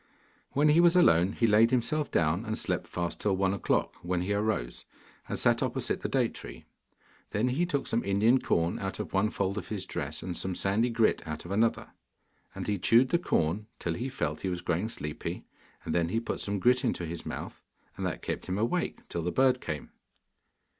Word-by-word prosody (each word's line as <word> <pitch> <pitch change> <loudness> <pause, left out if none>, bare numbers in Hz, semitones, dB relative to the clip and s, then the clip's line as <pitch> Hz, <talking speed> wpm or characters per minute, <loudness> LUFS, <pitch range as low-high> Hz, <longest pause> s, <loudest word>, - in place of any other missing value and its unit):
When 150 +2 +4
he 155 +3 +5
was 175 0 +6
alone, 95 - +5
he 115 - +1
laid 110 +1 +5
himself 135 +4 0
down 85 +4 +1
and 110 -1 -3
slept - - -2
fast 85 -1 -3
till 100 -2 +2
one 95 0 +2
o'clock, 100 - 0
when 90 +1 -1
he 95 +3 -1
arose, 105 - -1 0.5
and - - -2
sat - - +3
opposite - - -1
the - - -2
date - - +1
tree. - - -9 0.6
Then 110 +5 +1
he 160 +8 +1
took 140 -5 -1
some 115 - 0
Indian 110 +6 +3
corn 85 +1 +1
out 95 -1 -4
of - - -6
one 100 +2 +2
fold 100 0 -1
of - - -9
his 100 -3 -4
dress, 75 +3 -4
and 90 0 -4
some 95 +1 -2
sandy 105 +7 +1
grit 115 -1 +2
out 75 +2 -5
of 85 - -7
another. 110 +3 +1 0.6
And - - -4
he 105 -2 -1
chewed 120 +7 +4
the 170 - +2
corn 100 - 0
till 85 - -2
he 125 +10 -3
felt 75 - -3
he 95 - -1
was 90 -1 -3
growing 90 +5 -1
sleepy, 75 -8 -5 0.4
and 80 - -2
then 85 -1 +1
he 115 - +1
put 115 - -4
some 100 0 -2
grit 125 +6 +3
into 105 -8 -1
his 85 +1 -6
mouth, - - -6 0.3
and - - -5
that - - -3
kept - - -4
him 95 +1 -1
awake 115 +3 -1
till 85 - -3
the 90 +2 -1
bird 130 +1 +3
came. 75 - -5
100 Hz, 210 wpm, -29 LUFS, 85-120 Hz, 0.6 s, was